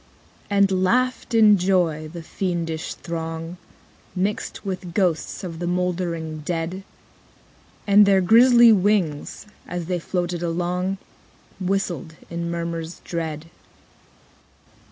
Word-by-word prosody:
15. 200 - 0 0.2
And 185 0 +1
laughed, 255 +5 +1
in 210 -3 +6
joy, 175 -4 +1
the 170 -1 -8
fiendish 165 -3 -3
throng, 165 0 -5 0.6
Mixed 195 +3 -2
with 185 -3 -5
ghosts 180 -4 0
of 165 -3 -6
the 175 - -3
mouldering 175 -3 -2
dead: 165 +4 -3 1.0
And 205 0 +6
their 195 -1 +5
grisly 235 +4 +7
wings, 195 -8 +1 0.2
as 175 -1 -4
they 180 +1 -1
floated 175 0 -2
along, 180 +3 -1 0.6
Whistled 180 -5 -2 0.2
in 170 0 -3
murmurs 170 0 -4
dread. 165 -1 -4
175 Hz, 110 wpm, -23 LUFS, 165-195 Hz, 1.0 s, grisly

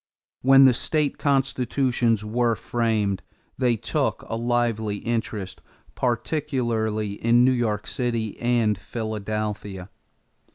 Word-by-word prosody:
When 135 +1 +7
the 130 - +6
state 150 +4 0
constitutions 130 -4 +1
were 115 +1 +1
framed 110 -6 -1 0.4
they 125 -2 +3
took 110 - -1
a - - -3
lively 115 -3 0
interest, 110 -3 -3 0.3
particularly 120 -5 -1
in 120 +2 +5
New 130 - +5
York 110 -5 -1
City 115 -4 -2
and 115 -4 +1
Philadelphia. 105 -3 -4
115 Hz, 100 wpm, -24 LUFS, 105-125 Hz, 0.4 s, When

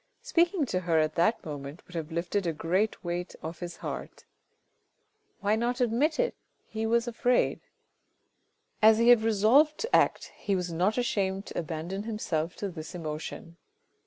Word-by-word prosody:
Speaking 350 - +2
to 185 -7 -1
her 170 -2 +1
at 155 0 +2
that 195 +8 +1
moment 145 0 -7
would 180 - -16
have 165 -1 -4
lifted 170 +3 -1
a 165 - 0
great 185 +7 0
weight 175 0 -4
off 160 +1 -6
his 175 -1 -6
heart. - - -6 1.2
Why 205 +1 +2
not 240 +3 -1
admit 250 +6 +2
it? - - +1 0.3
he 220 0 -3
was 235 +1 +2
afraid. 245 +1 +1 1.2
As 215 0 +7
he 230 +1 +4
had 240 -2 +7
resolved 225 +8 +4
to 460 - 0
act, - - +2
he 200 - -1
was 180 -2 -2
not 185 +7 +1
ashamed 195 -5 0
to - - -4
abandon 165 +4 -4
himself 185 -7 -2
to 200 - -4
this 160 -1 -8
emotion. 165 +1 -6
195 Hz, 160 wpm, -28 LUFS, 170-230 Hz, 1.2 s, As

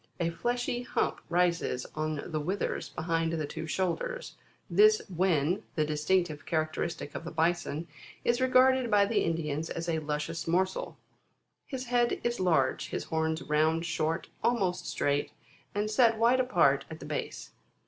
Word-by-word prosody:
A 170 -1 0
fleshy 245 +6 -1
hump 245 - -1
rises 170 -7 +1
on 155 -1 -2
the 155 - -3
withers 185 +7 -2
between 165 0 -1
the 160 -2 -1
two 160 - -6
shoulders; 190 - -2 0.3
this 430 +1 +5
wen, 175 +1 +2
the 155 - +2
distinctive 155 0 0
characteristic 155 -1 -2
of - - -5
the 165 - -5
Bison, 165 -1 0 0.4
is 240 +1 +2
regarded 260 -1 +4
by 205 -2 +5
the 215 +2 +1
Indians 160 -1 -2
as 170 0 -4
a 160 -1 0
luscious 150 +2 -3
morsel. 185 +3 0 0.7
His 265 -2 -5
head 240 -1 +1
is 240 0 -1
large; 160 -8 +1
his - - -3
horns 160 0 -1
round, 155 +2 +2
short, 165 -1 -1 0.2
almost 195 -7 +1
straight, 145 0 0 0.4
and 205 +1 0
set 225 0 +4
wide 235 +3 +4
apart 255 0 +3
at - - -8
the - - -9
base. - - -5
170 Hz, 150 wpm, -30 LUFS, 155-225 Hz, 0.7 s, this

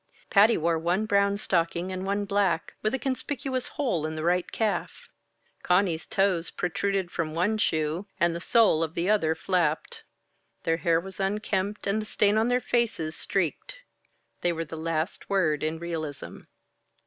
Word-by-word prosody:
Patty 215 +3 +6
wore 165 0 +1
one 175 +6 0
brown 200 -1 +2
stocking 175 -1 0
and 185 0 -4
one 200 +1 -1
black, 200 -4 0
with 215 +4 0
a - - 0
conspicuous 265 -1 -3
hole 240 - -1
in 155 - -5
the 155 - -4
right 175 +1 +1
calf. 220 -3 -2 0.5
Conny's 180 -3 +1
toes 190 -4 +1
protruded 190 +1 -1
from 155 -2 -3
one 205 +6 +1
shoe, 160 0 0
and 170 0 +3
the 170 - -5
sole 215 -7 +4
of 165 0 -2
the 175 +4 +1
other 160 -7 +2
flapped. 165 -3 -1 0.6
Their 165 0 +1
hair 165 -1 +2
was 190 +2 -9
unkempt 200 +1 -1
and 200 +2 +1
the 215 - -8
stain 205 -1 +2
on 220 +2 +3
their 245 0 +2
faces 225 -11 -1
streaked. 190 - -2 0.7
They 175 - +2
were 165 0 -3
the 160 - -8
last 160 +2 -3
word 165 -7 +2
in 155 +1 -1
realism. 160 -4 -5
185 Hz, 165 wpm, -27 LUFS, 165-205 Hz, 0.7 s, Patty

